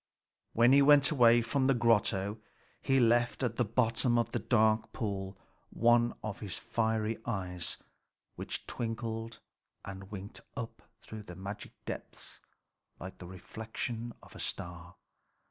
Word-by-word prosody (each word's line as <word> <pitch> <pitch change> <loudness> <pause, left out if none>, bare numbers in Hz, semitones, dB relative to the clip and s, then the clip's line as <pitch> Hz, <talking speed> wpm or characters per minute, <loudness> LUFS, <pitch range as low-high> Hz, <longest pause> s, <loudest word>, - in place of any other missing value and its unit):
When 120 +2 +5
he 140 +1 +7
went 140 -1 +6
away 120 -4 +6
from 130 +3 +1
the 135 - +4
grotto, 105 -3 +2 0.4
he 135 -1 +3
left 120 +1 +3
at 115 -2 -1
the 125 - +3
bottom 115 +2 +1
of 115 -1 +1
the - - -1
dark 110 -2 +2
pool 95 -3 -3 0.3
one 120 +1 +3
of 110 -2 -4
his 100 -3 -5
fiery 110 -1 -1
eyes, 90 -6 -3 0.6
which - - -5
twinkled 115 0 -4 0.5
and 95 0 -8
winked 100 -1 -8 0.2
up - - -5 0.2
through 110 -1 -8
the 90 -4 -10
magic 100 +3 -7
depths - - -8 0.6
like 95 0 -8
the 90 - -9
reflection 110 +5 -5
of - - -15
a - - -9
star. 85 +1 -5
110 Hz, 140 wpm, -32 LUFS, 100-120 Hz, 0.6 s, he